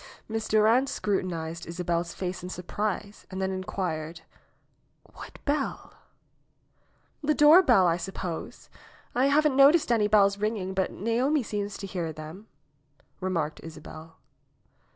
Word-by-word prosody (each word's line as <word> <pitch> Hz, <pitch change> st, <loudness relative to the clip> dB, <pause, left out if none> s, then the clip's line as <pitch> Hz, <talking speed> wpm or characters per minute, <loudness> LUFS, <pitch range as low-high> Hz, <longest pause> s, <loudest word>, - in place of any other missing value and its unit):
Miss 220 Hz, 0 st, -3 dB
Durand 225 Hz, +5 st, +3 dB
scrutinized 170 Hz, -5 st, -3 dB
Isabel's 170 Hz, 0 st, -2 dB
face 185 Hz, -1 st, -4 dB
in 180 Hz, -, -7 dB
surprise 205 Hz, +3 st, -4 dB
and 190 Hz, -, -6 dB
then 190 Hz, 0 st, -1 dB
inquired, 170 Hz, -4 st, -4 dB, 0.9 s
'^What -, -, -11 dB
bell?" 285 Hz, -1 st, -2 dB, 1.3 s
^^The 300 Hz, +1 st, +1 dB
doorbell, 295 Hz, -, +7 dB
I 170 Hz, -1 st, +2 dB
suppose. 175 Hz, -1 st, -6 dB, 0.5 s
I 255 Hz, +3 st, +3 dB
haven't 295 Hz, 0 st, +3 dB
noticed 280 Hz, +1 st, +5 dB
any 220 Hz, -3 st, +3 dB
bells 200 Hz, -1 st, +4 dB
ringing, 210 Hz, -3 st, -2 dB
but 190 Hz, 0 st, 0 dB
Naomi 245 Hz, +7 st, 0 dB
seems 205 Hz, -1 st, -4 dB
to 200 Hz, -, -6 dB
hear 180 Hz, -4 st, -3 dB
them," 155 Hz, +7 st, -10 dB, 0.7 s
remarked 170 Hz, -5 st, -2 dB
Isabel. 160 Hz, 0 st, -11 dB
195 Hz, 120 wpm, -27 LUFS, 170-225 Hz, 1.3 s, doorbell